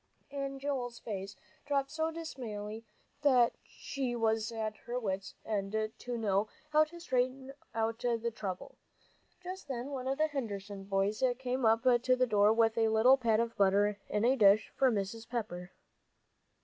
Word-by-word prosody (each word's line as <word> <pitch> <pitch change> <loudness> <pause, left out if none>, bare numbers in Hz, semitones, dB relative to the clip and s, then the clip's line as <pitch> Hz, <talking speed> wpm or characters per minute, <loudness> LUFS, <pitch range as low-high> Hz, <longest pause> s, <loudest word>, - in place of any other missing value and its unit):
And 275 -1 -4
Joel's 260 -4 -3
face 200 -3 -6 0.3
dropped 275 -1 0
so 320 0 0
dismally 225 -10 -6 0.4
that 255 -5 +5
she 260 -3 -4
was 225 -1 +1
at 220 -1 -3
her 240 +1 -2
wits' 195 -4 -3
end 215 +1 -1
to 245 -1 -4
know 205 -2 +1 0.2
how 310 0 +5
to 340 +3 -12
straighten 260 -2 -1 0.2
out 225 0 0
the 235 -1 0
trouble. 190 -5 -6 0.6
Just 370 -2 -7
then 260 0 -4
one 260 -2 -4
of 270 +1 0
the 310 - +3
Henderson 205 -9 -5
boys 200 +3 0
came 255 -1 0
up 225 +2 +3
to 255 0 +4
the 255 0 +3
door 210 -2 +4
with 225 0 +3
a 225 - +4
little 220 +4 +6
pat 230 -4 +2
of 230 0 -1
butter 200 +1 +3
in 210 +2 +1
a 255 +2 +4
dish 210 -3 +5
for 265 - +4
Mrs. 220 +2 -3
Pepper. 195 -7 -4
230 Hz, 160 wpm, -32 LUFS, 210-260 Hz, 0.6 s, little